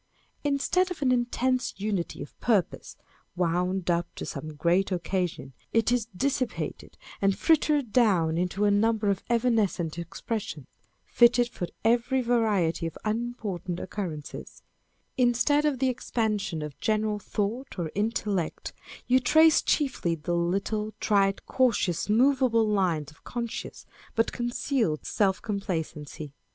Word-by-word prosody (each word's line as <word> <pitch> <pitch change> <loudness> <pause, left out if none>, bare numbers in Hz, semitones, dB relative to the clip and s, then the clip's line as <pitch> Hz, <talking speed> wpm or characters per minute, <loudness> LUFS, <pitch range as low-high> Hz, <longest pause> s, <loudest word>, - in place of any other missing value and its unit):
Instead 290 +6 +1
of 345 -5 -4
an 255 - +3
intense 250 +1 0
unity 200 -3 -2
of - - -13
purpose, 210 -8 0 0.4
wound 180 +1 0
up 170 0 0
to - - -5
some 155 +1 -6
great 175 +6 +2
occasion, 175 -5 -2 0.2
it 225 +1 +3
is 240 -3 +1
dissipated 265 -1 -2 0.2
and 195 -1 +2
frittered 300 -6 +2
down 185 -10 +3
into 180 +4 0
a 205 - +4
number 215 0 +2
of 195 - -2
evanescent 220 -9 +1
expressions, 170 - -5 0.4
fitted 240 0 +4
for 180 -7 -5 0.2
every 240 +3 +3
variety 215 -9 +1
of 165 - -8
unimportant 215 -6 -3
occurrences: 165 -8 -6 0.5
instead 255 +4 +3
of 295 -3 +1
the 265 +1 +1
expansion 215 -9 -2
of 150 -2 -8
general 215 -1 0
thought 210 +5 -3
or 165 -3 -3
intellect, 205 -4 -2 0.3
you 255 +1 +4
trace 315 +5 +5
chiefly 255 - 0
the 165 +2 -3
little, 200 +5 -1
trite, 195 -1 +2
cautious, 220 -9 +1
movable 245 -1 +3
lines 175 -8 0
of 155 - -23
con 240 -1 -3
scious - - -7 0.3
but 225 - +2
concealed 240 - -1
self 195 -3 +1
complacency. 160 -7 -4
210 Hz, 130 wpm, -27 LUFS, 175-240 Hz, 0.5 s, trace